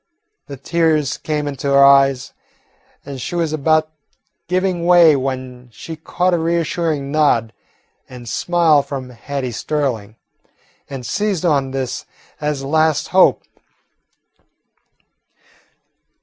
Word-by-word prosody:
The 140 - -8
tears 155 0 0
came 150 -1 -3
into 140 0 -4
her 140 0 +5
eyes, 135 -2 +4 0.7
and 135 -2 -7
she 175 - -5
was 165 -3 -1
about 155 +1 +1 0.6
giving 180 -1 -1
way 170 -4 +6
when 130 -2 -5
she 160 +8 -8
caught 175 +3 -1
a 175 - +1
reassuring 165 -3 -1
nod 130 -7 +2 0.6
and 125 -2 -11
smile 165 +3 +2
from 135 -2 -7
Hattie 130 +1 -5
Sterling, 115 -5 -3 0.7
and 135 -3 -7
seized 200 - -1
on 140 -5 +1
this 130 -2 -4 0.3
as 150 -2 -2
a - - -5
last 155 0 +1
hope. 185 0 +4
145 Hz, 115 wpm, -18 LUFS, 135-165 Hz, 0.7 s, way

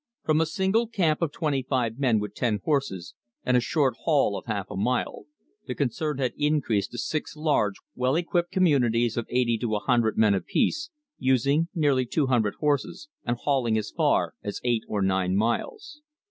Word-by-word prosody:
From 155 0 +2
a 160 - +1
single 190 +7 +1
camp 175 -9 0
of 165 -4 0
twenty 150 -4 -1
five 125 -2 -1
men 120 -6 +3
with 105 -1 -5
ten 110 -3 0
horses 115 - -1 0.3
and 125 - +2
a - - +6
short 135 0 +1
haul 140 -10 +2
of - - -7
half 100 -4 -3
a - - -5
mile, 120 +6 -1 0.4
the 125 - -3
concern 145 +2 -1
had 130 -3 -1
increased 145 -9 +1
to - - -6
six 150 +3 -3
large, 145 -10 +1 0.2
well 130 +2 0
equipped 175 +1 0
communities 120 - +2
of 120 - -3
eighty 120 -2 +1
to 110 -1 -1
a - - 0
hundred 120 -1 +1
men 110 -2 +4
apiece, 300 - 0 0.3
using 140 +5 +2
nearly 140 -6 +2
two 145 +4 +1
hundred 115 -6 +1
horses, 150 - -1 0.2
and 120 0 -1
hauling 125 -6 +1
as 110 - -3
far - - +1
as 100 - -5
eight 120 -2 +1
or 105 -2 -1
nine 95 -1 +1
miles. 300 - -2
130 Hz, 185 wpm, -26 LUFS, 110-155 Hz, 0.4 s, a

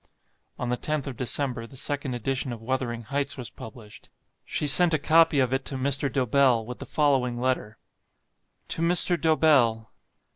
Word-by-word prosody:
On 125 - -4
the 125 - -1
10th 150 0 -3
of 135 - -7
December, 125 -1 -1
the 135 - -12
second 140 -2 -3
edition 130 +2 -3
of 120 - -7
"Wuthering 120 -2 -3
Heights" 140 +5 -3
was 125 -3 -8
published. 110 -2 -13 0.3
She - - -3
sent 165 +3 +7
a - - +1
copy 160 0 +3
of 130 -1 0
it 135 0 -1
to 135 - -4
Mr. 140 +1 0
Dobell, 130 -3 +1
with 125 +2 -9
the - - -9
following 130 -5 0
letter: 125 -4 -3 0.9
To - - -2
MR. 175 +1 +3
DOBELL. 140 -9 +2
130 Hz, 170 wpm, -25 LUFS, 120-145 Hz, 0.9 s, sent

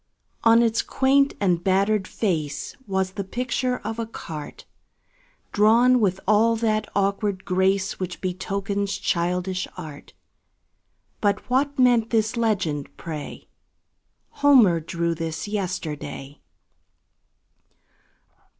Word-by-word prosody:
On 230 +1 +6
its 230 0 +2
quaint 275 +1 +2
and 180 -4 +1
battered 195 +1 +2
face 160 -9 -2
Was 190 -1 -1
the 200 0 -4
picture 250 +4 -2
of 220 +2 -4
a 230 - -3
cart, 155 -9 -8 0.9
Drawn 235 +4 +5
with 190 -4 +1
all 220 +2 +4
that 215 -2 0
awkward 200 0 0
grace 190 +1 +1
Which 185 -1 -4
betokens 200 +2 -2
childish 180 +2 -1
art; 155 -5 -9 1.1
But 205 -1 0
what 280 +2 +1
meant 240 -3 +4
this 220 0 +1
legend, 190 -11 -1
pray: 155 -3 -7 0.8
"Homer 245 -12 +5
drew 170 +1 -2
this 165 +2 -4
yesterday?" 155 -8 -5
200 Hz, 105 wpm, -24 LUFS, 180-225 Hz, 1.1 s, On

